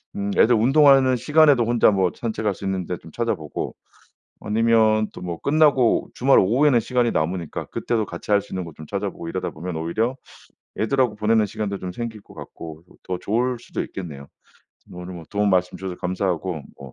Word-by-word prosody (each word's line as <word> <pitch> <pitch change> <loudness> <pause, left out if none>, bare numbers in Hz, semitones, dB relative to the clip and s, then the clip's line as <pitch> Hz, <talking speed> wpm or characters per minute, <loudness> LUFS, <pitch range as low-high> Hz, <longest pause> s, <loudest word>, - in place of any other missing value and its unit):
음 100 0 -2
애들 120 +2 +5
운동하는 135 +2 +5
시간에도 145 -1 +4
혼자 120 -1 +4
뭐 95 -3 +1
산책할 110 -3 -2
수 100 - -8
있는 95 -2 -2
데 90 - -4
좀 80 - -15
찾아보고. 95 -10 -3 0.7
아니면 110 0 +3
또 - - -10
뭐 85 -2 -5
끝나고 140 -5 +3
주말 135 +2 +4
오후에는 125 +7 +3
시간이 120 0 +1
남으니까 85 +1 -2
그때도 115 -3 -1
같이 85 +3 -7
할 100 - +4
수 - - -17
있는 95 -1 -3
곳 80 -3 -11
좀 80 - -10
찾아보고 100 -3 -4
이러다 95 +2 -3
보면 85 +1 -6
오히려 110 +11 -1 0.6
애들하고 120 -1 +1
보내는 110 0 +2
시간도 100 -1 -4
좀 90 - -5
생길 115 0 -6
것 - - -17
같고, 80 0 -10 0.2
더 90 -1 -4
좋을 120 +5 -1
수도 115 - -5
있겠네요. 75 -7 -8 0.7
오늘 90 +1 -8
뭐 85 -2 -9
도움 105 -1 +1
말씀 90 -1 +1
주셔서 95 -1 -5
감사하고 90 -3 -2 0.2
뭐 70 -2 -11
105 Hz, 390 characters per minute, -22 LUFS, 90-120 Hz, 0.7 s, 애들